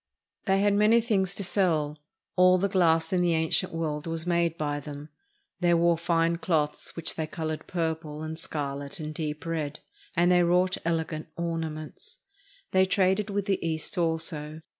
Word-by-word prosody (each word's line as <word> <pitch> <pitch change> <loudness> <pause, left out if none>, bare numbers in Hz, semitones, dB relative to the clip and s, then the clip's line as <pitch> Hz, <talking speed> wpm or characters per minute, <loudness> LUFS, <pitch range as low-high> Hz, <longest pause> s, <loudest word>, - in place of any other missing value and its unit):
They 195 0 +3
had 205 0 +3
many 210 +3 +5
things 195 -5 0
to 200 - -3
sell. 160 -6 +1 0.4
All 185 0 +6
the 195 +2 +1
glass 165 -3 +2
in 180 - +3
the 175 -2 +2
ancient 160 0 +1
world 155 -2 -3
was 165 0 -2
made 170 -2 +1
by 145 -1 -1
them. 145 +1 -8 0.5
They 175 -1 +3
wore 170 0 +4
fine 170 0 +1
cloths 155 -4 -1
which 165 -1 -2
they 160 -1 -3
colored 155 0 -4
purple, 160 -3 -3
and 160 +1 -5
scarlet, 145 +2 -5
and 155 0 -5
deep 155 0 -4
red, 155 -3 -3 0.3
and 175 +1 +4
they 180 0 +5
wrought 180 +2 +3
elegant 160 -1 -1
ornaments. 165 - -5 0.5
They 190 0 +5
traded 190 +2 +2
with 200 -1 -1
the 195 -2 0
East 160 +3 -2
also. 160 -2 -1
165 Hz, 165 wpm, -27 LUFS, 155-180 Hz, 0.5 s, All